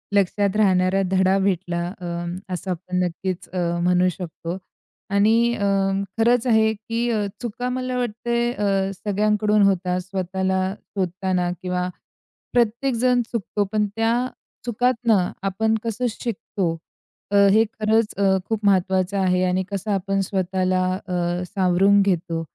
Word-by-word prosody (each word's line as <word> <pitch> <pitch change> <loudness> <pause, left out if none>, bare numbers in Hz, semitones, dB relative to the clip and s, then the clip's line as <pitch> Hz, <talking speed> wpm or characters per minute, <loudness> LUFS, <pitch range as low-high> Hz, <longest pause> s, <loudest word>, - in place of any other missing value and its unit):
लक्षात 200 +1 +2
राहणारा 190 -2 +3
धडा 190 0 +3
भेटला. 175 -3 0 0.2
अं, 175 0 -4 0.2
असं 185 +1 -3
आपण 180 +1 -3
नक्कीच 180 +1 -3
अ, 185 - -6 0.3
म्हणू 180 +1 +3
शकतो 175 0 -6 0.6
आणि 225 +4 +4
अं, 195 -1 +1
खरंच 235 +2 +3
आहे 220 -1 +4
की 230 +3 -3 0.3
चुका 245 +1 -3
मला 255 0 -2
वाटते 235 0 -1
अ, 195 -4 0
सगळ्यांकडून 210 +1 +1
होतात 180 -1 0
स्वतःला 190 0 -1 0.2
शोधताना 185 -1 -1
किंवा 180 0 -2 0.6
प्रत्येक 240 +3 +1
जण 245 +1 +3
चुकतो. 205 -2 -1
पण 210 -1 +1
त्या 225 +1 +2 0.5
चुकातनं 235 -5 +1 0.2
आपण 220 +3 +1
कसं 230 +2 -2
शिकतो 195 -7 -3 0.5
अ, 205 - +1 0.2
हे 220 +2 +5 0.2
खरंच 220 0 +2
अ, 200 - +1 0.3
खूप 220 -2 -1
महत्त्वाचं 190 0 +2
आहे 185 -1 +2
आणि 185 +1 +1
कसं 200 +2 -3
आपण 195 0 0
स्वतःला 185 -1 0 0.3
अ, 175 -1 -1
सावरून 195 +1 +3
घेतो 170 -4 0
195 Hz, 130 wpm, -22 LUFS, 185-220 Hz, 0.6 s, हे